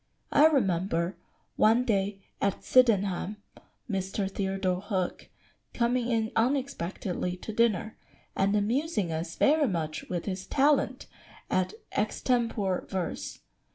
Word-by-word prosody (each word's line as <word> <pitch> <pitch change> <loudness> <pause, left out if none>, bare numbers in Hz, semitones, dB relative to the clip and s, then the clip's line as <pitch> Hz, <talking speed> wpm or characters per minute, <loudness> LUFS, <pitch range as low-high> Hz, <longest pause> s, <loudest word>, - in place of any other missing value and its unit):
] - - -43
"I 305 - +7
remember, 185 - +1 0.4
one 230 +3 +4
day 195 -3 0 0.2
at 200 -1 0
Sydenham, 205 -5 +3 0.5
Mr. 195 -1 -2
Theodore 190 -2 -1
Hook 190 -3 -3 0.5
coming 240 0 +1
in 225 -2 0
unexpectedly 215 -8 -1
to 220 - -7
dinner, 220 -1 +1 0.4
and 200 +1 +2
amusing 215 - 0
us 165 +1 -3
very 295 0 +4
much 160 -6 -3
with 175 -2 -3
his 190 -1 -4
talent 285 +1 +2 0.5
at 185 +2 +1 0.2
extempore 215 -3 0
verse. 185 -2 -4
200 Hz, 115 wpm, -28 LUFS, 185-235 Hz, 0.5 s, I